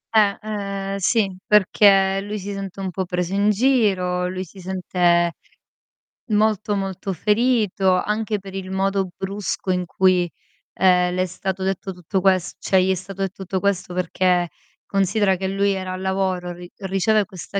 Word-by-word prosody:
Eh. 205 -2 +4
Ehm, 200 -2 -4
sì, 195 -1 +1
perché 195 -1 +4
lui 210 +1 -5
si 200 +1 -5
sente 195 -1 -6
un 190 -1 -3
po' 190 +2 -2
preso 180 +1 -2
in 200 +1 +3
giro, 195 -7 +2
lui 185 0 -4
si 190 +2 -14
sente 175 -2 +1 1.0
molto, 210 -1 +1
molto 195 0 -3
ferito 210 -2 +2
anche 210 0 -1
per 195 0 -10
il 190 -1 -5
modo 195 0 0
brusco 195 0 -4
in 180 -1 +1
cui, 180 0 +2 0.5
ehm, 180 -1 +3
le 185 - 0
è - - +2
stato 190 +1 -4
detto 190 0 -2
tutto 180 +2 -2
ques 185 -1 +2
cioè, 190 -1 +2
gli 190 - +1
è - - +2
stato 195 +2 -7
detto 195 0 -3
tutto 190 +1 -2
questo, 195 -2 -1
perché 180 -1 +1 0.4
considera 195 0 +2
che 190 +1 -3
lui 200 +1 +1
era 185 -1 -4
al 185 - -6
lavoro, 190 -2 -1
ri 175 0 -9
riceve 195 +2 +1
questa 190 +2 -6
190 Hz, 165 wpm, -22 LUFS, 185-200 Hz, 1.0 s, Eh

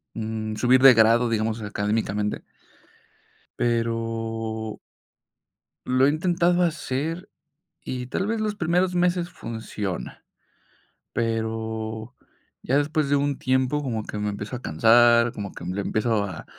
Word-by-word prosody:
mm, 110 -1 -4
subir 130 +2 +4
de 135 -1 +9
grado, 115 +1 +4
digamos, 110 0 -1
académicamente. 105 0 -1 1.2
Pero 115 -1 -2 1.1
lo 130 +1 +3
he - - +4
intentado 175 +3 +2
hacer, 165 +1 -2 0.5
y 125 -1 -5
tal 190 +8 -2
vez 225 +1 -1
los 210 -1 -1
primeros 180 +1 +1
meses 175 0 +1
funciona, 110 -4 -6 0.9
pero 110 0 -3 0.5
ya 135 - +1
después 150 0 0
de 145 - +3
un 140 0 0
tiempo 130 +3 +1
como 115 -6 -3
que 105 - -6
me 105 0 -1
empiezo 105 +4 -5
a 125 - -7
cansar, 115 +6 +5
como 100 -3 -6
que, - - -10
mm, 90 +1 -3
le 100 - -2
empiezo 110 +1 0
a, 95 -6 -6
115 Hz, 130 wpm, -24 LUFS, 110-145 Hz, 1.2 s, de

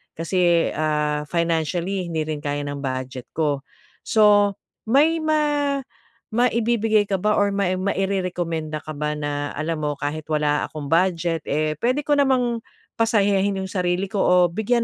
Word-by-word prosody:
Kasi, 170 0 +2
ah, 150 -1 0
financially 170 +3 -1
hindi 160 -1 -1
rin 155 -1 -3
kaya 145 0 -2
ng 145 0 -4
budget 130 -1 -4
ko. 145 -3 0 0.4
So, 205 -2 +4 0.3
may 305 +7 +3
ma-maibibigay 240 -7 0
ka 195 - +1
ba 210 - +2
or 205 0 +3
may 185 -2 +1
mairerekomenda 180 -5 -2
ka 155 - -7
ba, 150 0 -1
na 145 -1 -3
alam 155 +1 -2
mo, 145 0 0
kahit 150 +1 -4
wala 150 -1 +1
akong 150 -2 -7
budget, 170 -2 +1
eh, 155 +1 0
puwede 255 +5 +1
ko 290 -1 +2
namang 250 -4 +2 0.4
pasayahin 200 -3 +2
yung 190 - -6
sarili 180 0 0
ko 200 - -1
o 180 - +4 0.2
bigyan 230 +5 +1
180 Hz, 145 wpm, -22 LUFS, 155-220 Hz, 0.4 s, So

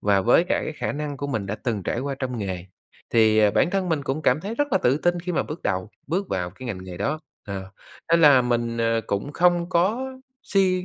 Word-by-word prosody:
và 100 -1 +3
với 120 - +4
cả - - 0
cái - - -4
khả 155 - -3
năng 145 -1 -4
của 140 +1 -4
mình 110 -8 -2
đã 100 - -2
từng 110 -6 -3
trải 120 - -2
qua 140 +1 -2
trong 125 -2 -3
nghề, 95 -3 -4 0.4
thì, 110 -1 +4
ờ, 105 -1 +5
bản 170 - +2
thân 195 -2 0
mình 160 -4 0
cũng 140 +3 -2
cảm 130 +3 +3
thấy 210 +5 -4
rất 290 +1 -1
là 190 - +4
tự 130 -2 +2
tin 175 +1 +1
khi 180 +1 -4
mà - - +1
bước 155 +2 -7
đầu 95 +2 -1 0.2
bước 185 +6 -1
vào 90 -2 -2
cái 130 +8 -10
ngành 95 -6 -5
nghề 90 -1 -8
đó, 145 - -1 0.3
ờ. 95 -1 -6 0.4
Nên 170 - +6
là 140 -5 +7
mình, 120 -1 -1
ờ, 115 0 +2
cũng 100 +9 -2
không 175 0 +3
có 205 +9 +1 0.4
suy 185 -2 +2
135 Hz, 250 wpm, -24 LUFS, 105-175 Hz, 0.4 s, là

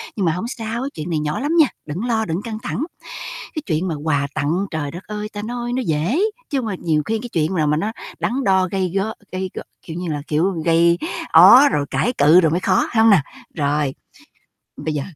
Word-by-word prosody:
Nhưng 200 - 0
mà 165 - +3
hổng 180 +7 -3
sao, 235 0 -4
chuyện 155 +2 -6
này 160 -3 0
nhỏ 150 0 -2
lắm 290 +3 -1
nha, 305 - +7 0.2
đừng 165 +9 -4
lo, 225 -2 0
đừng 165 +1 -2
căng 220 -1 -5
thẳng. 250 - -2 0.7
Cái 310 - -3
chuyện 165 +1 0
mà 165 - -1
quà 145 -3 +1
tặng, 165 +7 0
trời 150 -3 -3
đất 175 +5 -8
ơi, 210 0 -5
ta 205 0 -5
nói 240 +1 -4
nó 255 +1 0
dễ, 165 - +1 0.3
chứ 280 - 0
hông 250 - -2
mà 210 - -2
nhiều 155 -3 +1
khi 225 +7 -1
cái 240 +2 -7
chuyện 165 -2 0
là 155 -4 +1
mà 150 +1 +2
nó 210 +8 -1 0.3
đắn 260 +3 -1
đo 190 -1 +3
gây 185 -3 -1
go 200 +3 0 0.2
gây 185 0 -3
gổ, - - -5 0.2
kiểu 160 - -8
như 180 0 -4
là, 145 -1 -3
kiểu, 165 +6 +1
gây 170 +1 +4 0.3
ó 275 +4 +9
rồi 145 - -1
cãi 245 - +1
cự 155 +5 +7
rồi 160 -3 +2
mới 175 +4 0
khó, 185 -1 +2
phải 220 - +4
hông 225 - +6
nè? 190 -7 +5 0.3
Rồi, 145 -2 0 0.8
bây 155 - -3
giờ 145 - -1
185 Hz, 235 wpm, -20 LUFS, 155-220 Hz, 0.8 s, ó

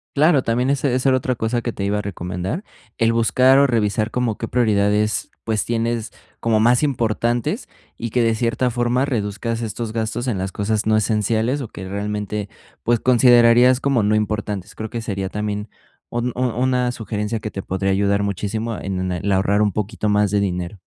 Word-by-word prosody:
Claro, 150 0 +4
también 125 +3 +1
esa 140 0 +1
esa 130 +2 +2
era 130 - +4
otra 130 0 -1
cosa 115 +2 -1
que 120 - -3
te 100 - -5
iba 105 +1 0
a - - -1
recomendar. 95 - -4 0.3
El 115 0 +2
buscar 130 +4 +4
o 140 - +5
revisar 110 -2 0
como 120 -3 -1
qué 115 - -3
prioridades, 105 -2 +1
pues, 110 -3 -1
tienes 115 -1 -1 0.3
como 110 -2 +2
más 120 +2 +4
importantes 120 -4 -1 0.3
y 115 - -4
que, 120 +1 +1
de 115 -1 +3
cierta 120 +2 0
forma, 120 +2 +1
reduzcas 115 -2 -2
estos 110 0 -4
gastos 115 +2 -2
en 110 -6 -1
las 95 +1 -3
cosas 105 +2 -1
no 110 0 +4
esenciales 110 +5 0
o 125 - -5
que 95 -2 -9
realmente, 105 +1 -3 0.3
pues, 120 -1 +2
considerarías 120 0 +5
como 135 -4 +1
no 105 +1 +2
importantes. 105 -2 -2
Creo 110 0 -6
que 115 - -4
sería 100 -4 -3
también 105 0 -3 0.4
un 120 +1 -1
u 125 - -3
una 125 0 +1
sugerencia 110 -1 -3
que 110 - -6
te 95 - -5
podría 95 +1 -1
ayudar 100 +1 +1
muchísimo 105 +3 -2
en 95 -1 -3
el 95 +3 -2
ahorrar 100 +2 +2
un 105 -1 +2
poquito 105 +1 -2
más 105 -1 +2
de 105 - +2
dinero. 90 0 -3
110 Hz, 190 wpm, -21 LUFS, 105-120 Hz, 0.4 s, o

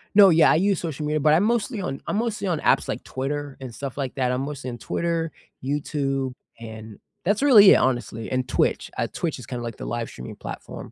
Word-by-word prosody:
No, 200 -2 +9
yeah, 165 -2 +6
I - - +4
use 195 +3 +2
social 155 -3 -4
media, 150 +1 0
but 150 +1 +5
I'm 165 +5 +4
mostly 230 0 0
on 135 -7 -4
I'm - - -1
mostly 220 -3 -1
on 165 -4 0
apps - - +2
like - - -3
Twitter 140 +1 -4
and 125 -3 -7
stuff 140 +1 -6
like 135 -3 -3
that, 125 -2 +1
I'm 125 +1 -1
mostly 140 -2 -5
on 120 - -6
Twitter, 165 +5 -2 0.3
YouTube, 135 -1 -1 0.3
and 110 -2 -9 0.2
that's 205 +4 +1
really 215 -9 +9
it, - - +8
honestly, 120 -3 -1
and 130 0 0
Twitch, - - 0
uh, - - 0
Twitch 160 -5 -3
is 125 - -9
kinda 125 -2 -5
like 115 -2 -6
the - - -7
live-streaming 115 - -5
platform. - - -8
145 Hz, 220 wpm, -24 LUFS, 125-175 Hz, 0.3 s, No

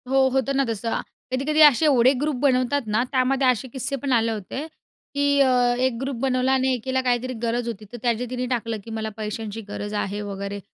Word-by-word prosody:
हो, 270 0 +4
होतं 265 +1 +1
ना 275 - +3
तसं. 225 +1 -2 0.3
कधी-कधी 290 +4 +1
असे 295 0 +7
एवढे 260 -3 +5
ग्रुप 300 -1 0
बनवतात 270 0 +2
ना, 215 +3 +1
त्यामध्ये 265 0 +2
असे 255 +1 +1
किस्से 275 +1 -3
पण 275 +1 -3
आले 230 -1 +2
होते 220 +7 -5 0.5
की 285 0 +1 0.2
अ, 250 -2 +3
एक 255 -2 +1
ग्रुप 270 0 -2
बनवला 260 -1 +1
आणि 260 0 +2
एकीला 260 +2 -1
काहीतरी 250 0 0
गरज 235 +1 -1
होती, 220 -2 -5
तर 240 - -7
त्याचे 240 0 0
तिने 250 0 -3
टाकलं 230 -3 -2
की 225 - -10
मला 220 0 -3
पैशांची 215 0 -5
गरज 205 0 -5
आहे 205 0 -2
वगैरे 200 0 -5
250 Hz, 200 wpm, -23 LUFS, 225-265 Hz, 0.5 s, असे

